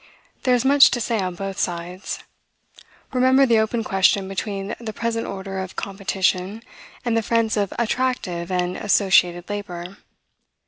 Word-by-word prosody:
There 250 -1 +5
is 245 +1 0
much 280 +1 +7
to 240 - -1
say 230 -1 -1
on 185 -2 -2
both 195 +1 -5
sides. 175 +2 -3 1.0
Remember 260 +2 +5
the 230 -3 +4
open 220 +1 0
question 195 0 +2
between 195 +1 -4
the 225 -2 -6
present 230 +1 -2
order 195 0 -5
of 190 -1 -6
"competition," 195 +1 -1 0.4
and 235 -2 +1
the 225 - +3
friends 225 0 +1
of 200 -2 0
"attractive 230 -8 -1
and 180 0 -1
associated 185 -4 +3
labor." 195 -3 -6
200 Hz, 145 wpm, -22 LUFS, 185-230 Hz, 1.0 s, much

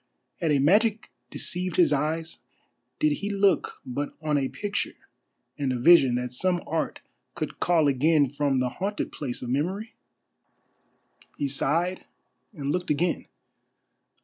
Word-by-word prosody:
Had 165 - 0
a 145 - +4
magic 205 - +3 0.2
deceived 180 +4 -3
his 170 -4 +4
eyes? 155 +1 -2 0.6
Did 155 - +2
he 200 - -4
look 200 -1 +1
but 140 +3 -4
on 155 -1 0
a 135 -2 +1
picture 205 -1 -3 0.6
and 140 -2 0
a 125 - -1
vision 135 -2 +6
that 125 0 -3
some 175 +6 0
art 160 0 -2 0.3
could - - -5
call 165 -4 +3
again 145 +2 +3
from 145 -2 0
the 125 -1 +1
haunted 200 +9 -3
place 130 -5 -5
of 120 - -5
Memory? 190 - -2 1.4
He 145 - 0
sighed 165 +7 -1 0.5
and 145 -8 -3
looked 180 +2 -2
again. 165 +3 0
155 Hz, 140 wpm, -26 LUFS, 140-180 Hz, 1.4 s, vision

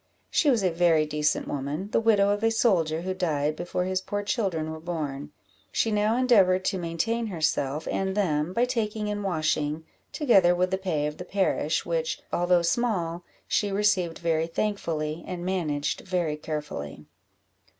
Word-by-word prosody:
She 300 - +3
was 235 -7 +3
a 185 - +2
very 165 -2 +3
decent 150 0 0
woman, 145 +8 -4
the - - +3
widow 210 -3 +4
of 205 +1 -1
a 225 - +4
soldier, 170 -8 +2
who 185 +1 -2
died 155 -5 0
before 175 +2 -2
his 185 0 -1
poor 205 +2 -3
children 185 -8 -1
were 160 - -6
born; 150 -4 -4 0.4
she 225 - +1
now 210 +2 +2
endeavoured 195 -8 +4
to 190 - 0
maintain 225 +8 -1
herself 155 -5 -1
and 190 +1 -1
them 155 -5 +1
by 235 +6 +2
taking 215 -4 -2
in 205 0 -2
washing, 155 -4 -1 0.3
together 195 - +4
with 180 +1 +1
the 190 - 0
pay 165 -6 -1
of 150 0 -4
the - - -6
parish, 180 -4 0
which, 165 -1 -1
although 175 0 +3
small, 175 -4 0 0.2
she 205 -1 +1
received 195 -4 +1
very 165 -1 0
thankfully, 165 -4 -2
and 180 -1 -5
managed 155 -6 -1
very 175 -5 -1
carefully. 150 - -6
175 Hz, 165 wpm, -26 LUFS, 155-205 Hz, 0.4 s, widow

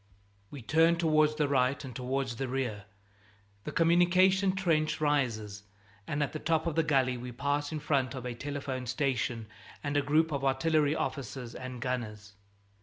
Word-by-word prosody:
We 140 -4 -9
turn 165 +6 +4
towards 155 -2 +3
the 150 -1 +1
right 135 0 +1
and 125 - -8
towards 130 -1 -2
the 135 - -2
rear. 125 -6 -3 0.8
The - - -4
communication 185 +3 +4
trench 165 -5 +1
rises, 115 -9 0 0.5
and 145 +1 0
at 145 - -3
the 155 - -4
top 160 +1 0
of 165 - -1
the 165 - +3
gully 135 -5 +1
we 125 +1 -7
pass 145 +4 -1
in 155 - -3
front 140 -3 0
of 130 -1 -6
a 125 - -3
telephone 135 -1 -5
station 125 -3 -1 0.4
and 145 -1 -2
a 145 - +4
group 155 +3 +2
of 140 -2 -2
artillery 145 +2 +2
officers 125 -5 -4
and 130 -1 -7
gunners. 105 -5 -4
140 Hz, 170 wpm, -30 LUFS, 125-155 Hz, 0.8 s, turn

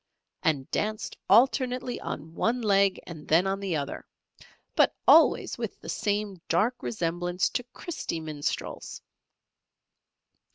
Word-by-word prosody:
and 145 -6 0
danced 215 0 -2
alternately 250 +2 +3
on 160 +2 -6
one 235 +8 0
leg 200 -4 +3
and 160 -3 -10
then 165 +4 +4
on 195 0 -1
the 195 -4 -2
other, 140 -2 -4 0.7
but - - +4
always - - +5
with - - -5
the - - -10
same 205 -3 -2
dark 220 +9 +1
resemblance 175 -2 -1
to - - -2
Christy 255 - -5
Minstrels. 155 -2 -4
195 Hz, 120 wpm, -27 LUFS, 165-225 Hz, 0.7 s, always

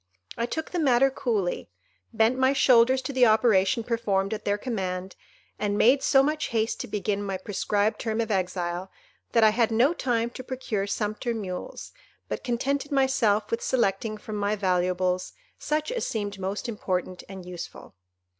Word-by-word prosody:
I 235 - -1
took 320 +5 -4
the 355 - -1
matter 270 -2 +4
coolly, 210 - -2 0.4
bent 225 +3 +3
my 260 +1 +3
shoulders 260 -1 +4
to 275 - -4
the 255 -2 +5
operation 220 0 +3
performed 215 -4 0
at 215 - -6
their 205 0 +1
command, 190 -5 -4 0.4
and 205 -1 0
made 260 +6 +5
so 270 0 +4
much 305 +2 0
haste 225 0 -1
to - - -4
begin 205 -1 -2
my 195 -2 -3
prescribed 205 +2 -1
term 220 -1 -2
of 225 -1 -1
exile, 180 -1 -2 0.4
that 230 - +5
I 215 - +7
had 225 +1 +2
no 240 +8 +3
time 235 -6 -1
to 255 - -8
procure 240 -6 -3
sumpter 215 +3 -2
mules, 205 - -6 0.4
but - - -4
contented 275 +4 -1
myself 260 -7 +2
with 230 - -1
selecting 215 -2 0
from 210 0 -6
my 205 +1 0
valuables 185 -1 0 0.3
such 305 +4 -1
as - - -2
seemed 205 -3 -3
most 195 +4 -3
important 185 -5 -3
and 190 -2 -9
useful. 175 -1 -9
220 Hz, 165 wpm, -26 LUFS, 195-255 Hz, 0.4 s, I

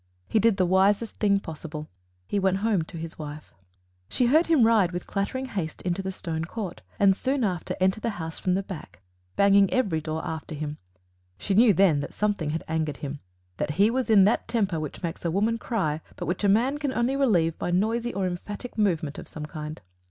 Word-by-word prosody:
He 220 - +2
did 225 -1 +3
the 185 - +3
wisest 195 +4 +2
thing 200 -2 +3
possible: 155 -3 -7 0.4
he 205 - 0
went 190 -1 +2
home 210 -6 +2
to 170 - -9
his 165 0 -6
wife. 150 0 -8 0.6
She 250 - +2
heard 310 +8 +4
him 320 -7 +5
ride 215 -6 +4
with 175 - -4
clattering 215 +7 -2
haste 185 - -4
into 180 +1 -1
the 190 0 -3
stone 160 -3 -4
court, 190 -1 -6 0.2
and 195 -1 +5
soon 265 +4 0
after 180 -6 -1
enter 190 +3 +2
the 230 - -1
house 160 -1 -5
from 180 -1 +1
the 195 - -1
back, 125 - -9 0.3
banging 200 -1 +5
every 195 -11 +1
door 155 +1 -4
after 160 0 -5
him. 150 0 -5 0.6
She 195 - -2
knew 225 +3 +6
then 180 -5 +4
that 140 - -6
something 205 -7 0
had 160 +2 -2
angered 160 -3 -1
him 145 0 -5 0.4
that 150 - -2
he 205 +3 +5
was 255 0 -1
in 205 -3 +7
that 205 +4 +2
temper 200 -8 0
which 155 +2 -6
makes 165 -1 -4
a 170 - 0
woman 215 +6 +1
cry, 170 -11 -1
but - - -5
which 175 +4 -2
a 200 - +4
man 250 +8 +2
can 290 -3 -1
only 245 +2 +1
relieve 180 - +2
by - - -2
noisy 225 +6 +1
or 195 -1 -1
emphatic 205 +6 -5
movement 165 -8 0
of - - -9
some 150 -1 -7
kind. 155 0 -7
190 Hz, 210 wpm, -26 LUFS, 160-220 Hz, 0.6 s, in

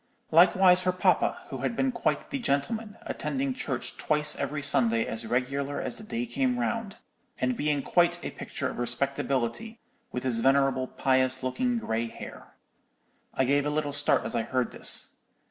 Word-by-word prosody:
Likewise 180 +2 +6
her 185 0 +2
papa, 180 - +2
which - - -5
had 235 - -1
been 265 +2 +1
quite 235 -2 -2
the 280 - -2
gentleman, 220 - -2
attending 270 -1 -2
church 135 - -4
twice 150 0 +2
every 140 +1 -3
Sunday 115 -4 +2
as 110 0 -3
regular 135 +4 -1
as - - -4
the - - -9
day 230 +3 -3
came 255 +1 0
round, 230 -4 -2 0.4
and 125 0 0
being 145 0 0
quite 175 -1 +3
a - - -3
picture - - -5
of - - -6
respectability, 135 - -1 0.3
with 125 - -4
his 125 -3 +2
venerable 135 0 +2
pious 130 0 +1
looking 245 - 0
grey 115 - -2
hair.' - - -11 0.8
"I 130 - +2
gave 140 +2 +2
a 150 - -1
little 150 -1 -1
start 145 0 +2
as - - -3
I 115 - +2
heard 125 +2 -1
this. - - +2
145 Hz, 170 wpm, -28 LUFS, 130-210 Hz, 0.8 s, Likewise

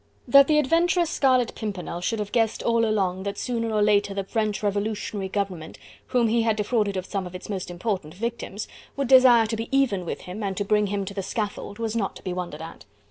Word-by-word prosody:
That 275 +2 +7
the 305 - +3
adventurous 335 +3 +2
Scarlet 255 -5 +2
Pimpernel 190 -5 -5
should 225 +5 -1
have 210 -1 -4
guessed 225 -2 +1
all 230 0 +2
along, 190 -4 0
that 200 +1 -4
sooner 230 -2 -2
or 210 -1 +2
later 205 -1 +2
the 195 - -1
French 215 +1 -2
Revolutionary 205 -1 -2
Government 190 -5 -3 0.3
whom 240 -2 +2
he 230 +1 +2
had 225 -1 +2
defrauded 210 -2 0
of 185 - -3
some 195 -2 -3
of 180 - -10
its 180 - -8
most 190 -4 -4
important 175 -3 -3
victims, 225 -1 -4 0.3
would 275 -2 0
desire 250 -3 +7
to 220 +1 -2
be 225 +1 -5
even 270 -9 +2
with 170 - -5
him, 185 +4 -7
and 195 -2 -3
to 205 - -1
bring 210 0 +2
him 200 0 -2
to 200 - -6
the 195 - -3
scaffold, 205 0 -4
was 225 -1 -3
not 205 -4 -1
to - - -12
be 185 - -3
wondered 175 -4 -5
at. 165 - -10
210 Hz, 225 wpm, -25 LUFS, 195-230 Hz, 0.3 s, That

